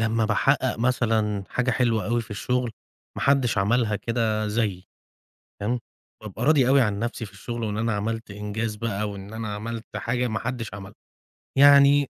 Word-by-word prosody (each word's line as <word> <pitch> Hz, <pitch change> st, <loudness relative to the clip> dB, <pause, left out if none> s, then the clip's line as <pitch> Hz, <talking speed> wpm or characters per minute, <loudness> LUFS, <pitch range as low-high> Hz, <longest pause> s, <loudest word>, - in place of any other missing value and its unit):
لمّا 115 Hz, 0 st, +1 dB
باحقق 130 Hz, +3 st, +1 dB
مثلًا 110 Hz, -4 st, +1 dB
حاجة 125 Hz, 0 st, 0 dB
حلوة 115 Hz, -2 st, +1 dB
أوي 120 Hz, +2 st, +1 dB
في 110 Hz, -, -17 dB
الشغل 125 Hz, +4 st, -1 dB, 0.5 s
ما -, -, -3 dB
حدش 135 Hz, -6 st, +2 dB
عملها 110 Hz, +1 st, +2 dB
كده 110 Hz, -1 st, -1 dB
زيّي، 105 Hz, -4 st, -1 dB, 0.8 s
تمام، 120 Hz, +4 st, 0 dB, 0.4 s
بابقى 105 Hz, +1 st, -6 dB
راضي 145 Hz, -5 st, +4 dB
أوي 135 Hz, +1 st, +5 dB
عن 105 Hz, -4 st, 0 dB
نفْسي 115 Hz, 0 st, -3 dB
في 100 Hz, -, -12 dB
الشغل 120 Hz, +3 st, -5 dB
وإن 105 Hz, -1 st, -2 dB
أنا 115 Hz, +1 st, 0 dB
عملت 110 Hz, +1 st, -3 dB
إنجاز 105 Hz, +2 st, -3 dB
بقى 105 Hz, -1 st, -2 dB
وإن 100 Hz, +1 st, -9 dB
أنا 110 Hz, -2 st, -4 dB
عملت 115 Hz, +2 st, -5 dB
حاجة 120 Hz, +4 st, -1 dB
ما 110 Hz, -1 st, -2 dB
حدش 120 Hz, -3 st, -4 dB
عملها. 95 Hz, -1 st, -9 dB, 0.7 s
يعني 140 Hz, 0 st, +7 dB
115 Hz, 165 wpm, -25 LUFS, 105-125 Hz, 0.8 s, يعني